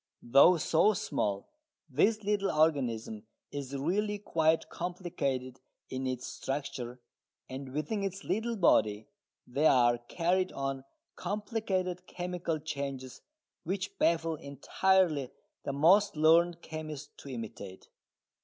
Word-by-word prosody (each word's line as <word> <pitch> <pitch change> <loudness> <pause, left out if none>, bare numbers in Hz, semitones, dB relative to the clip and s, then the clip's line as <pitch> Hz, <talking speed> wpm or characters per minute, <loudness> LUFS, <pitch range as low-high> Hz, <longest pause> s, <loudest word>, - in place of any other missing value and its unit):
Though 140 +9 +6
so 165 +6 +3
small, 100 - -2 0.4
this 205 - +2
little 200 -1 +1
organism 125 -9 +1 0.3
is 140 -1 -5
really 205 +9 0
quite 160 -5 +1
complicated 140 -8 -3 0.3
in 130 0 -2
its 130 -1 -3
structure, 130 -3 -4 0.5
and 130 0 -7
within 155 - -2
its 195 0 -4
little 230 +3 -1
body 110 - +3 0.4
there 145 +5 +3
are 120 -2 +4
carried 180 +9 0
on 135 -1 -3 0.3
complicated 195 -4 -2
chemical 175 -2 -3
changes 140 -4 -5 0.4
which 190 +3 -4
baffle 165 -1 +2
entirely 150 +1 +1 0.4
the - - -1
most 180 +9 +4
learned 165 +2 +4
chemist 155 -2 -7
to 140 - -10
imitate. 110 -6 -8
155 Hz, 110 wpm, -31 LUFS, 130-185 Hz, 0.5 s, Though